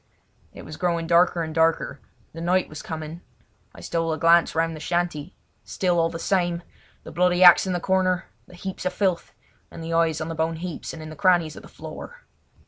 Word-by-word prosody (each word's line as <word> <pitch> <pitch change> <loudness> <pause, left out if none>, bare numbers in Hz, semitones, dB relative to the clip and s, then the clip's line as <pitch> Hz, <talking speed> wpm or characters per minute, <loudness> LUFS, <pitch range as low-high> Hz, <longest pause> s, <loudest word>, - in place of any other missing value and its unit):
It - - -11
was 155 - -9
growing 170 -2 0
darker 170 0 +3
and 160 -1 -5
darker; 160 -3 +1 0.3
the 165 - -8
night 180 +2 +1
was 155 - -9
coming. 160 +1 -7 0.5
I - - -11
stole 165 -1 -1
a 155 - -1
glance 165 +2 +4
round 165 0 0
the - - -8
shanty, 175 -1 -2 0.3
still 180 -2 0
all 165 0 +2
the 165 - -6
same! 175 -1 0 0.4
The - - -10
bloody 180 +1 +3
axe 180 +1 +8
in 185 - -1
the 175 - -1
corner, 185 -1 +1 0.2
the 180 - -14
heaps 190 +1 -6
of 185 - -1
filth, 185 -4 -1 0.4
and 165 - -9
the 165 +1 -4
eyes 165 -2 +2
on 155 - -4
the 165 - -4
bone 160 +1 -1
heaps 175 +1 -6
and 160 - -9
in 155 - -8
the - - -9
crannies 170 -2 +2
of - - -10
the - - -13
floor. - - -10
170 Hz, 215 wpm, -24 LUFS, 160-180 Hz, 0.5 s, axe